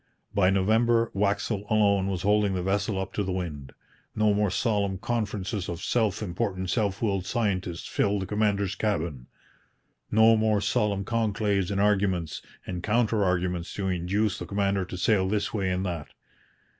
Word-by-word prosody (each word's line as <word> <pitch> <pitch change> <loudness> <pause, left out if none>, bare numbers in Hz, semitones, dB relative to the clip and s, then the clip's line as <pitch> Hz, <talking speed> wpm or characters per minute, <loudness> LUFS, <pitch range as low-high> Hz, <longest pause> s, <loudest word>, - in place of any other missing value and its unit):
By 100 -3 +4
November, 115 +4 +2
Waxel 100 +1 -1
alone 100 -3 +3
was 95 -2 -2
holding 105 -1 +2
the 90 - -2
vessel 100 +1 0
up 95 - -4
to 105 - -1
the 95 - -3
wind. 75 -7 -4 0.4
No 110 -1 +3
more 105 0 +2
solemn 100 -2 0
conferences 105 -2 -2
of 85 -1 -4
self 110 -4 0
important, 95 -1 -2
self 100 -2 0
willed 95 -4 0
scientists 95 -7 -1
filled 100 -1 0
the - - -4
commander's 100 -2 0
cabin! 85 - -2 0.8
No 110 +1 +6
more 110 -1 +2
solemn 100 -2 0
conclaves 105 -4 0
and 100 -1 -1
arguments 95 -5 +1 0.2
and 90 -1 -4
counter 110 0 +1
arguments 90 -2 -1
to 95 -2 -2
induce 95 +3 0
the - - -6
commander 100 -1 0
to 90 - -7
sail 95 +1 +2
this 105 0 -1
way 100 -4 0
and 90 +1 -1
that! 85 -5 -4
100 Hz, 160 wpm, -27 LUFS, 95-105 Hz, 0.8 s, No